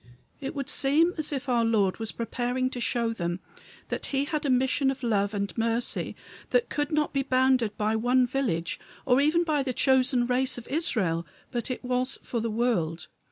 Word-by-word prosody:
It 280 +3 -5
would 275 -3 -3
seem 315 +6 +3
as 300 -1 0
if 275 -1 -3
our 240 -2 +2
Lord 215 -4 +2
was 225 -1 -2
preparing 245 +2 -2
to 250 - -4
show 235 -1 0
them 175 -4 -3 0.5
that - - -3
he 275 0 0
had 305 -1 -2
a - - +1
mission 265 +2 +2
of 270 -1 -4
love 205 -4 +1
and 200 0 -2
mercy 230 +1 0 0.3
that - - +2
could 295 +1 -1
not 305 -1 +1
be 275 - +2
bounded 255 -4 +2
by 215 +1 +1
one 250 +3 +3
village, 230 -10 -1 0.3
or 255 +1 +4
even 315 +4 +3
by 305 -4 +1
the 260 -2 -2
chosen 255 -1 +3
race 255 +1 +1
of 240 - -9
Israel, 190 - 0 0.2
but 240 0 -3
was 255 +1 0
for 235 - -2
the 230 +1 -1
world. 210 -9 -1
250 Hz, 190 wpm, -27 LUFS, 225-275 Hz, 0.5 s, or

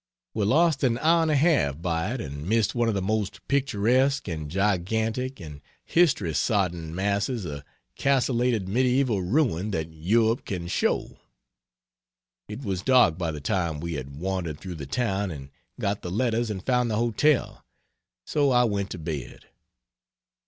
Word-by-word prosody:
We 105 -2 0
lost 155 +5 +3
an 120 -3 +2
hour 165 +5 +3
and 160 - +1
a 150 - +3
half 140 - +2
by 85 +3 -1
it 125 - -4
and 70 +3 -6
missed 110 -1 +2
one 120 -1 +1
of 110 - +1
the 95 - -1
most 100 -1 -2
picturesque 130 0 +1
and 80 -4 -4
gigantic 110 - -1
and 75 -5 -9 0.2
history 130 - +2
sodden 85 -6 0
masses 100 +3 -1
of 70 -3 -5 0.3
castellated 125 -6 +1
medieval 125 0 +2
ruin 105 - +1
that 80 -4 -3
Europe 110 +8 +1
can 90 -3 -4
show. - - -1 1.3
It 105 +6 -7
was 95 -5 -2
dark 115 -9 +4
by 85 -2 -1
the 75 -2 -5
time 85 0 -1
we 85 +2 -4
had 70 -1 -6
wandered 90 -3 -3
through 90 -2 -7
the 70 - -6
town 100 - -1
and 70 -4 -8 0.3
got 100 +1 -1
the 90 - -5
letters 115 +3 0
and 95 -3 -5
found 125 -2 +2
the 110 - 0
hotel 120 +5 +1 0.6
so 145 -2 +2
I 125 -1 +4
went 100 -4 -1
to - - -6
bed. 80 -6 -6
100 Hz, 160 wpm, -26 LUFS, 85-125 Hz, 1.3 s, dark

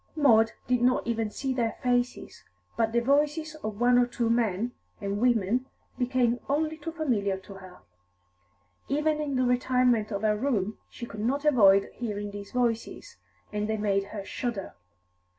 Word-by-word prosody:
Maud 225 -7 +4
did 250 -1 +1
not 250 +1 +2
even 225 -2 -1
see 265 +5 -3
their 235 -3 0
faces, 245 0 -1 0.3
but 225 -1 +1
the 235 +1 +2
voices 295 +4 +1
of 215 -1 -4
one 245 0 +5
or 245 - +3
two 235 -1 -1
men 230 -1 0 0.3
and 200 +1 -3
women 240 +1 +2 0.3
became 245 -1 +1
only 310 +2 0
too 315 +1 -6
familiar 230 - 0
to 190 +1 -12
her; 185 -2 -13 1.1
even 300 +2 +1
in 285 -2 -2
the 255 - +2
retirement 250 -3 +2
of 200 0 -3
her 215 -1 +3
room 215 -4 -1
she 240 - -8
could 220 - -9
not 275 +6 -1
avoid 200 -9 +5
hearing 205 -3 -4
these 200 0 -8
voices, 235 - -2 0.4
and 210 +1 -2
they 220 - 0
made 200 -2 0
her 200 -1 -7
shudder. 235 -5 -4
235 Hz, 165 wpm, -27 LUFS, 210-255 Hz, 1.1 s, one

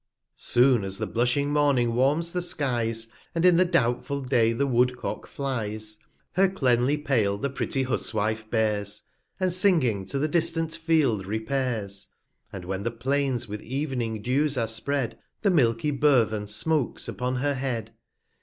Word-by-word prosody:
Soon 120 -3 +3
as 95 0 -4
the - - -2
blushing 125 +5 0
Morning 140 -5 +2
warms 145 +7 +1
the 180 - -1
Skies, 120 -9 0 0.3
And 165 +1 +1
in 180 -2 +6
the 185 - +5
doubtful 140 -4 0
Day 120 -3 +2
the 135 +5 0
Woodcock 125 -1 0
flies, 110 -5 -4 0.3
Her 190 +1 +3
cleanly 130 -5 +2
Pail 115 -9 +1
the 140 +6 -3
pretty 135 +1 -1
Huswife 110 -3 -1
bears, 105 -2 0 0.4
235 185 - 0
And 180 - +1
singing 155 - +3
to 120 - -3
the 145 +3 +1
distant 165 0 +1
Field 155 - +1
repairs: 110 -3 -2 0.4
And 95 -3 -8
when 95 +1 -3
the 115 - -1
Plains 130 +1 -1
with 105 0 -6
ev'ning 125 -5 -3
Dews 140 +3 +1
are 115 -2 +1
spread, 120 +3 -2 0.2
The 200 - +4
milky 125 -3 +2
Burthen 120 -7 +2
smoaks 140 +7 0
upon 125 +1 -2
her 140 +3 0
Head. 125 -5 -3
125 Hz, 155 wpm, -26 LUFS, 110-145 Hz, 0.4 s, in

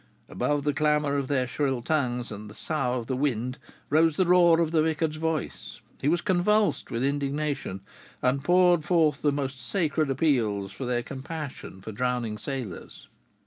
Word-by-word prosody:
Above 145 -1 -1
the 145 0 +1
clamor 150 -1 +1
of 140 -2 -1
their 130 -2 +1
shrill 135 0 -1
tongues 125 -5 -1
and 105 0 -7
the 105 - -12
sough 135 -6 -1
of 120 - -4
the 130 - -2
wind 125 -2 -1 0.3
rose 160 +1 +4
the 185 - +3
roar 175 -2 +5
of 165 -2 +1
the 160 -2 +3
vicar's 160 0 0
voice: 160 -3 -3 0.2
he 135 - 0
was 170 +3 +2
convulsed 205 +3 +2
with 115 +2 -2
indignation, 140 -6 -2 0.4
and 130 +2 +1
poured 175 -2 +4
forth 160 -3 +2
the 145 - +3
most 135 -2 -3
sacred 155 -2 0
appeals 115 -9 +1
to 125 - -5
their 120 -1 0
compassion 135 -8 -7
for 110 - -7
drowning 120 -1 -2
sailors. 125 - -6
140 Hz, 170 wpm, -27 LUFS, 125-160 Hz, 0.4 s, roar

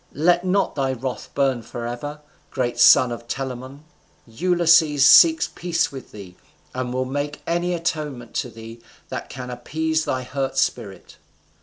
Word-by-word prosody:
Let 175 +4 +3
not 185 0 +1
thy 135 -2 -1
wrath 130 0 -5
burn 135 -3 +1
forever, 120 +6 -6 0.3
great 120 -3 -2
son 120 0 +7
of 120 0 -7
Telamon. 130 +2 -6 0.4
Ulysses 160 +1 +3
seeks 320 - +7
peace 170 0 -1
with 135 -2 -10
thee, 95 -4 -11 0.4
and 130 -1 -3
will 130 +1 -1
make 145 +3 -4
any 175 +1 -1
atonement 155 -8 -4
to - - -2
thee 115 +1 -11 0.3
that - - -6
can 125 -1 -7
appease 160 +6 -2
thy 130 0 -2
hurt 135 +1 -4
spirit." 100 -6 -3
135 Hz, 145 wpm, -22 LUFS, 120-160 Hz, 0.4 s, son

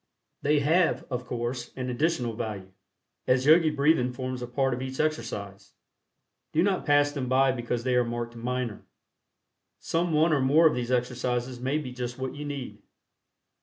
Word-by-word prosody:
They 145 0 +2
have, 165 +4 +2
of 125 0 -3
course, 120 0 -3
an 130 -1 -3
additional 125 -3 0
value, 105 -5 -5 0.6
as 125 +1 +3
Yogi 160 +1 +6
Breathing 145 -3 +2
forms 130 0 -4
a 125 - -4
part 135 +1 0
of 125 - -4
each 130 0 -5
exercise. 105 -9 -3 0.8
Do 160 - +3
not 190 -3 0
pass 145 0 +4
them 135 -4 -4
by 130 +1 +4
because 120 -1 -3
they 130 0 0
are 125 - +4
marked 120 0 -4
"minor." 120 -1 -3 1.0
Some 170 +1 -1
one 155 +1 +3
or 140 - +2
more 145 +5 +5
of 155 - +6
these 125 0 -3
exercises 125 0 -1
may 135 +4 0
be 140 -5 -5
just 125 -1 -5
what 130 0 -4
you 145 +1 -7
need. 130 -8 -6
130 Hz, 170 wpm, -27 LUFS, 120-145 Hz, 1.0 s, Yogi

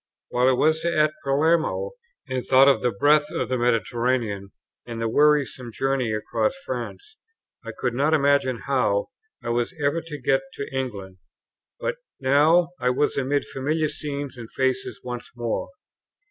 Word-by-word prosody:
While 125 +1 +2
I - - +4
was 155 +5 +2
at 155 -3 +2
Palermo 160 - +1 0.4
and 130 -1 -2
thought 135 +1 +6
of 140 - +4
the 125 - +2
breadth 150 +7 +3
of 125 - -3
the 130 - 0
Mediterranean, 115 -3 0 0.3
and 115 -1 -7
the 115 - 0
wearisome 140 -2 +2
journey 135 -1 0
across 110 - -1
France, 430 +8 -6 0.5
I - - -6
could 125 -2 -1
not 140 +5 +1
imagine 140 -4 +2
how 125 -7 +1 0.3
I - - -4
was 120 +8 -1
ever 145 +3 +1
to 160 -2 -7
get 135 - +2
to 140 - -5
England; 100 -8 -4 0.6
but - - -2 0.2
now 150 +6 +4
I 125 - +1
was 140 +4 +1
amid 140 +1 0
familiar 155 +3 -1
scenes 145 -3 -5
and 115 -2 -9
faces 130 -1 -1
once 125 -1 -6
more. 120 - -2
135 Hz, 155 wpm, -24 LUFS, 120-150 Hz, 0.6 s, thought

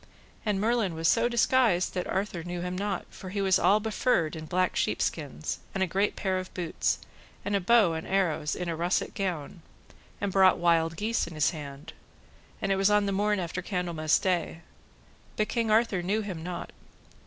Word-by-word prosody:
And 210 -3 0
Merlin 220 -4 +1
was 165 0 0
so 235 +1 +3
disguised 235 -5 +3
that 180 -1 -2
King - - -5
Arthur 190 -3 -2
knew 175 0 -5
him 180 +1 -3
not, 195 0 -2
for 185 - -9
he 200 +2 -3
was 190 -1 +3
all 205 +2 +4
befurred 210 -6 0
in 155 0 -7
black 185 +2 +1
sheep - - 0
skins, 155 -1 -3 0.2
and 190 - +1
a - - +3
great 195 +3 0
pair 190 -2 -1
of 185 - -7
boots, 175 -3 0 0.5
and 205 - 0
a - - +3
bow 205 -3 +4
and 160 0 -5
arrows, 165 -6 0
in 180 - -4
a 165 - -1
russet 175 +3 0
gown, 175 -3 -4 0.6
and 200 -1 -1
brought 190 -1 +5
wild 165 -1 +2
geese 225 +1 0
in 170 - -9
his 150 -1 +2
hand, 150 0 -8 0.7
and 195 - +1
it 195 - +2
was 195 +1 +3
on 210 0 +3
the 200 - 0
morn 205 +1 +1
after 180 0 -3
Candlemas 170 -4 0
day; 175 -3 -1 0.7
but 215 - 0
King 230 -2 0
Arthur 215 -4 +3
knew 200 +5 0
him 185 -6 -5
not. 175 +1 -6
185 Hz, 200 wpm, -28 LUFS, 170-205 Hz, 0.7 s, brought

